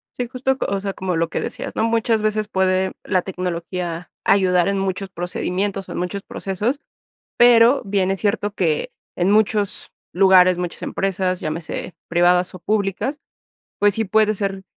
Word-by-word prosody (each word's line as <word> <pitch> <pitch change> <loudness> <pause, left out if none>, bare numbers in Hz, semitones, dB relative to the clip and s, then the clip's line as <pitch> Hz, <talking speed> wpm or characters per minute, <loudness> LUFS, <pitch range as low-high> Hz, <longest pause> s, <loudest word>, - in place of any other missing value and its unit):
Sí, 245 - -3
justo, 260 +1 -1
co - - -2
o 200 - -1
sea, 195 -1 -3
como 185 -2 -3
lo 165 0 0
que - - -2
decías, - - -5
¿no? - - 0
Muchas 230 -1 +1
veces 215 0 0
puede 190 -1 +1
la 185 - +1
tecnología 175 -2 -4
ayudar 180 -2 +3
en 200 0 0
muchos 195 0 -2
procedimientos 185 +2 -3
o - - -9
en - - -5
muchos 185 +3 -3
procesos, 210 +9 -3 0.6
pero 240 +2 +6
bien 195 -1 0
es 195 - -2
cierto 205 0 0
que 160 -6 0 0.3
en 180 +2 +1
muchos 210 -1 +1 0.2
lugares, 185 -1 +5
muchas 180 -1 -5
empresas, 185 -1 -1
llámese 160 +3 -5
privadas 175 +1 +3
o - - -7
públicas, 205 - -1 0.6
pues 205 -1 +3
sí, 225 - 0
puede 215 +2 +2
ser 195 -1 -3
195 Hz, 165 wpm, -21 LUFS, 180-210 Hz, 0.6 s, pero